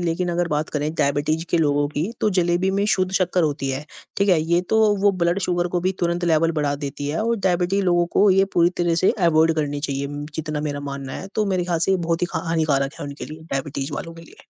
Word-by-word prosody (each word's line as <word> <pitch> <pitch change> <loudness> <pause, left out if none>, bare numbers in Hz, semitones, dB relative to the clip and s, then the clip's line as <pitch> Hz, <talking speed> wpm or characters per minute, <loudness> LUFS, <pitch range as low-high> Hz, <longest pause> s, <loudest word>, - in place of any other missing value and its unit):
लेकिन 175 +1 -1
अगर 175 0 0
बात 150 +1 -1
करें 150 +1 -2
डायबिटीज़ 145 +3 0
के 170 - +2
लोगों 145 -2 +2
की 155 +7 -2
तो - - +3
जलेबी 175 +2 +2
में 200 +1 0
शुद्ध 185 -1 0
शक्कर 185 -1 +1
होती 145 -3 -1
है, 135 +3 -4 0.3
ठीक 200 +1 +1
है? 175 -4 +4
ये 170 +2 +2
तो 220 - +3 0.2
वो 205 0 +5
ब्लड 170 +2 +2
शुगर 175 -1 0
को 175 0 -1
भी 185 +2 0
तुरंत 175 0 0
लेवल 165 0 +2
बढ़ा 145 -1 0
देती 140 +1 -4
है 155 - -1
और 230 +1 +1
डायबिटी 180 +2 +1
लोगों 175 -2 +2
को 205 - +4
ये 195 +1 +4
पूरी 170 0 +4
तरह 175 -1 +2
से 185 - +5
अवॉइड 165 -2 +3
करनी 145 -2 -2
चाहिए 140 -1 -2 0.3
जितना 155 -1 -3
मेरा 145 -1 -3
मानना 140 -1 -6
है। - - -6
तो 215 - +1
मेरे 185 -2 0
ख़्याल 175 -2 0
से 170 - +1
ये 190 - +4
बहुत 170 +1 0
ही - - +3
ख़ा 170 - -1
हानिकारक 150 -4 +1
है - - -4
उनके 140 0 -7
लिए, 155 +1 -10
डायबिटीज़ 135 +1 -3
वालों 165 +2 -5
के 165 - -12
लिए। - - -17
165 Hz, 245 wpm, -22 LUFS, 150-180 Hz, 0.3 s, वो